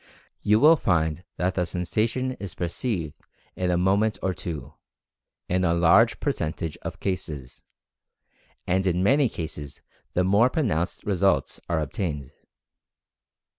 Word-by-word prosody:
You 105 +1 +4
will 155 +4 +7
find 80 - 0
that 90 +1 0
the 90 - 0
sensation 110 +9 -1
is 100 -4 -6
perceived 85 - -3 0.4
in 90 -1 -1
a 90 - +2
mo 95 +2 +3
ment 110 +1 +1
or 95 - +1
two, 85 -4 -6 0.7
in 90 +1 +1
a 85 -1 +2
large 95 +8 +5
percentage 80 - -2
of - - -6
cases, 75 -9 -4 1.0
and 95 +1 +1
in 90 0 +1
many 135 +4 +4
cases 75 -5 -7 0.3
the 90 - +3
more 100 +7 +4
pronounced 100 - -1
results 100 -1 +1
are 85 -2 +1
obtained. 75 -2 -3
90 Hz, 135 wpm, -25 LUFS, 85-105 Hz, 1.0 s, will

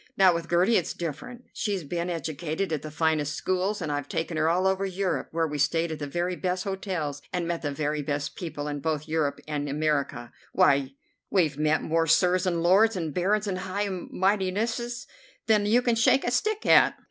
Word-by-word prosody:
Now, 190 -2 +6
with 170 0 -4
Gertie 180 +7 +4
it's 175 - -2
different. 170 - -6
She's 200 -5 -2
been 170 +4 -3
educated 165 +2 -3
at 155 - -2
the 155 - -7
finest 155 -2 0
schools, 185 +2 -1
and 155 - -2
I've 145 -1 -3
taken 165 +1 -2
her 155 +1 +2
all 180 +3 +1
over 190 0 +1
Europe, 190 0 -2
where 165 0 0
we 150 -1 -4
stayed 165 +4 +1
at 155 - -5
the 145 - -4
very 175 +5 -2
best 180 0 -2
hotels 185 -7 -3
and 175 -2 -2
met 170 -1 -2
the 145 - -2
very 150 +1 -2
best 145 0 -3
people 155 -4 -5
in 145 -1 -3
both 155 0 -2
Europe 155 -2 0
and 145 -1 -3
America. 140 -5 -1 0.2
Why, 135 -1 +3 0.3
we've 155 -7 +1
met 155 +1 +2
more 165 0 +1
Sirs 180 +3 +3
and 170 -2 0
Lords 200 +6 +5
and 165 -5 -3
Barons 200 +5 +1
and 190 -3 -2
High 195 +2 -2
Mightinesses 205 +6 -1 0.4
than 210 -2 +3
you 240 +4 +3
can 240 - +2
shake 235 +4 +3
a 240 - 0
stick 430 - 0
at. - - +6
170 Hz, 200 wpm, -26 LUFS, 150-190 Hz, 0.4 s, Now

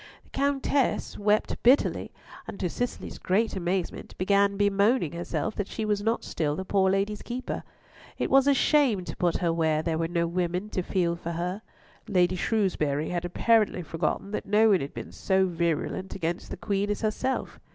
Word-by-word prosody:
The - - -26
Countess 280 -1 0
wept 210 +1 +1
bitterly, 255 +4 +3 0.4
and 200 - -7
to 180 -3 -1
Cicely's 245 0 -4
great 210 +4 +1
amazement 180 -1 -3
began 200 +1 +2
bemoaning 205 - +2
herself 170 +5 -3
that 205 - -2
she 220 - -4
was 210 -1 0
not 225 +3 0
still 150 -2 -1
the 190 - -5
poor 190 -1 +2
lady's 200 +2 0
keeper. 250 +2 -4 0.6
It - - -2
was 270 +1 +5
a 285 - +6
shame 260 - +3
to - - -6
put 175 -2 +1
her 170 -2 0
where 160 -2 +1
there 160 -1 -1
were 165 - 0
no 170 0 0
women 180 +3 -2
to 185 - -1
feel 175 -2 0
for 170 0 -5
her. 180 +5 -3 0.5
Lady 185 -3 +2
Shrewsbury 175 -9 0
had 175 -1 -2
apparently 210 +1 +2
forgotten 165 +5 -2
that 210 - -4
no 215 +2 +5
one 195 -4 +4
had 140 - -6
been - - -7
so 190 -1 +1
virulent 170 +1 -2
against 170 -1 -3
the - - -6
Queen 200 -1 -1
as 205 - -2
herself. 220 +4 -2
190 Hz, 185 wpm, -27 LUFS, 170-215 Hz, 0.6 s, a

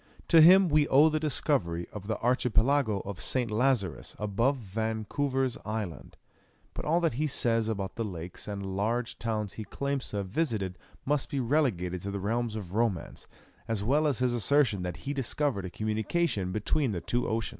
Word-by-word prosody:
To 165 - +8
him 185 +4 +8
we 150 -2 +3
owe 145 +4 +6
the 155 0 0
discovery 125 - 0
of 100 -1 -8
the 110 -2 -1
Archipelago 125 -2 +2
of 95 -2 -7
St. 125 -4 +1
Lazarus 105 - 0
above 115 +7 0
Vancouver's 115 +5 -2
Island; 105 -5 -5 0.6
but - - -6
all 165 +3 +3
that 165 -6 +1
he 155 - +2
says 115 -4 +1
about 100 -3 -4
the 115 - -1
lakes 90 -3 -6
and 100 -2 -4
large 115 +4 -1
towns 110 -3 -2
he 110 - -6
claims 140 +6 -3
to 105 - -4
have 100 -1 -3
visited 100 - -1 0.3
must 145 0 0
be 140 - -2
relegated 115 - 0
to 100 - -4
the 100 0 -3
realms 115 +3 -1
of 95 -4 -6
romance, 105 -6 -2 0.4
as 110 -3 -1
well 145 +7 +2
as 140 -5 +1
his 125 -1 +1
assertion 120 -3 +2
that 90 -1 -4
he 140 - -1
discovered 135 -5 -1
a - - -4
communication 110 - -1
between 110 +5 0
the 85 - -3
two 120 +8 -1
oceans. 110 0 -1
115 Hz, 180 wpm, -29 LUFS, 100-135 Hz, 0.6 s, To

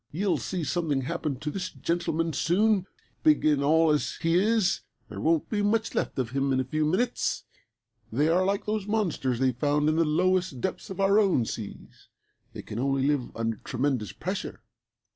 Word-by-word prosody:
"You'll 190 +5 0
see 180 -3 -3
something 150 -3 0
happen 150 0 -2
to 150 - -3
this 185 +1 -4
gentleman 165 -1 -1
soon. 195 +5 +2 0.3
Big 310 - +4
and 145 -2 +3
all 160 +2 +4
as 150 - 0
he 165 0 +1
is 200 +1 +2 0.3
there - - -7
won't 160 -1 +2
be 210 -2 -1
much 220 +2 +1
left - - -2
of 125 -3 -1
him 135 +1 0
in 130 - +2
a - - +1
few 155 +4 -1
minutes. 230 +10 0 0.7
They 145 +7 +2
are 175 +3 +3
like 200 +1 0
those 210 -1 -2
monsters 180 - 0
they 130 +1 +2
found 145 +4 +1
in 155 - +1
the 165 - +4
lowest 180 -1 +1
depths 185 - -3
of 190 - -7
our 195 +2 +4
own 185 - +3
seas. 110 -2 -8 0.5
They - - -7
can 105 - -6
only 135 +1 +1
live 140 -4 +1
under 115 -1 -2
tremendous 130 - -2
pressure. - - -5
160 Hz, 185 wpm, -27 LUFS, 135-190 Hz, 0.7 s, Big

